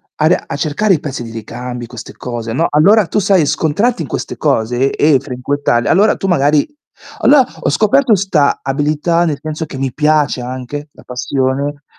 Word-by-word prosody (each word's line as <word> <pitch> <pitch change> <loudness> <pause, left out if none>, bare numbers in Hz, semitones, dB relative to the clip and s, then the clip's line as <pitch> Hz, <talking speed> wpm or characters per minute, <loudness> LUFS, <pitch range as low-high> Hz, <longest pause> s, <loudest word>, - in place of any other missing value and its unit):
a 155 - 0
ri 175 - +4
a 140 - -4
cercare 175 +7 +1
i - - -3
pezzi 140 -5 -5
di 115 - -8
ricambi, 120 +2 -7
queste 120 -2 -10
cose, 120 -2 -6
no, 165 +6 +1
allora 200 +8 +4
tu 195 - 0
sai, 185 -5 +3
scontrarti 170 - 0
in 150 - -4
queste - - -4
cose 120 +4 +1
e 145 -3 +3
frequentarle, 125 -1 -1
allora 205 +4 +4
tu - - -5
magari 150 - +2 0.5
allora 275 -3 +5 0.2
ho - - 0
scoperto 220 +2 +3
'sta 180 -7 +1
abilità, 150 +5 0
nel 150 -4 -1
senso 155 +1 -4
che 135 - -8
mi 135 -2 -2
piace 150 -3 +1
anche 130 +4 -6
la - - -17
passione 135 +3 -2
145 Hz, 180 wpm, -15 LUFS, 130-170 Hz, 0.5 s, allora